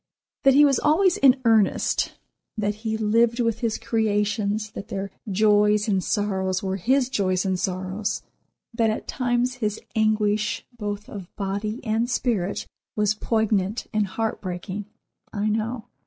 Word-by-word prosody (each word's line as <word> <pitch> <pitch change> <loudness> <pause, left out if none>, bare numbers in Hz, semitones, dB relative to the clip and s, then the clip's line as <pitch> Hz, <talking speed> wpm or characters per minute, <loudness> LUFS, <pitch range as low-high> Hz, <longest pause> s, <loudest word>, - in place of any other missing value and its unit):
That 270 -1 +5
he 295 +1 +8
was 275 -2 +3
always 350 +4 +3
in 265 -1 +5
earnest, 220 -3 +2 0.4
that 205 -1 0
he 220 -1 -1
lived 230 +2 +2
with 230 -2 +1
his 230 -2 -1
creations, 210 -1 0
that 200 - -8
their 195 0 -4 0.2
joys 210 +1 +3
and 195 -3 +1
sorrows 190 -2 -1
were 190 0 -1
his 255 +7 +2
joys 185 -6 0
and 190 -1 0
sorrows, 190 +3 -2 0.5
that 230 -1 +2
at 215 - -3
times 245 0 0
his 210 -1 -1 0.2
anguish, 215 -1 +1
both 205 -2 -5
of 195 -4 -8
body 205 +4 -3
and 225 +2 0
spirit, 220 -7 -1 0.3
was 210 -1 +2
poignant 215 -1 0
and 215 -2 +1
heart 225 +4 -3
breaking, 185 +2 -5 0.5
I 210 0 -1
know. 220 +2 -2
215 Hz, 145 wpm, -24 LUFS, 200-230 Hz, 0.5 s, he